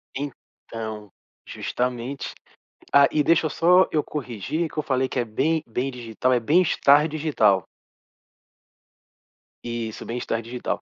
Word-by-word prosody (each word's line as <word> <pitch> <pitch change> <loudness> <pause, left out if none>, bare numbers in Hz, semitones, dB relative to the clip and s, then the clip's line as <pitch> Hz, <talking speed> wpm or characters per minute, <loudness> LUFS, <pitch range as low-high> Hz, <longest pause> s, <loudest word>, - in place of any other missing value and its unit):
Então, 110 -6 -7 0.4
justamente. 125 +2 -3 0.6
Ah, 140 0 +7
e 150 - +2
deixa 165 +1 +3
eu - - -2
só 180 +2 +4
eu 150 -2 +2
corrigir 150 - -3
que - - -9
eu - - +1
falei 130 -3 0
que - - -4
é - - 0
bem 150 +8 0
bem 125 +4 -2
digital, 125 +1 -2
é 125 - +3
bem-estar 150 0 +4
digital. 125 - +2 2.0
Isso. 115 -2 -5
Bem-estar 115 -1 -3
digital. 120 +2 -4
130 Hz, 130 wpm, -24 LUFS, 115-150 Hz, 2.0 s, Ah